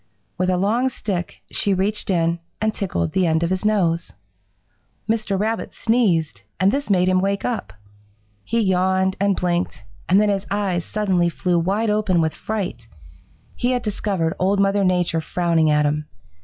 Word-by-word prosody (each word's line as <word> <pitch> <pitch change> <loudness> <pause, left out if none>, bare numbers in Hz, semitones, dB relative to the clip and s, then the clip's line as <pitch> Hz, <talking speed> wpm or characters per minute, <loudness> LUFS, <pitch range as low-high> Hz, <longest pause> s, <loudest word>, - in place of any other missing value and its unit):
With 185 0 0
a 180 - +2
long 225 +7 +1
stick 190 -7 -4
she 200 -1 +1
reached 205 +3 -1
in 170 -2 +1 0.2
and 220 0 0
tickled 85 - -2
the 185 -2 +2
end 160 +1 +2
of 170 - 0
his 185 +1 -1
nose. 175 -6 +1 1.0
"Mr. 215 -3 0
Rabbit 220 +2 -2
sneezed, 180 - +1 0.2
and 190 +2 +4
this 280 0 -2
made 185 -2 +3
him 185 0 +3
wake 200 +1 -1
up. 225 - -3 0.7
He 230 +1 0
yawned 190 -1 +2
and 200 0 +2
blinked, 175 - -1 0.3
and 190 +2 +5
then 210 0 +3
his 200 -1 -1
eyes 195 -4 -1
suddenly 190 -5 +1
flew 175 +1 0
wide 205 +6 0
open 210 -4 +1
with 160 -1 +1
fright. 195 - -4 0.7
He 245 +1 0
had 245 -1 -1
discovered 195 -6 -1
Old 195 +2 +2
Mother 200 0 +2
Nature 180 -3 +1
frowning 165 -2 +1
at 150 0 +3
him. 150 +1 -1
190 Hz, 170 wpm, -21 LUFS, 175-210 Hz, 1.0 s, and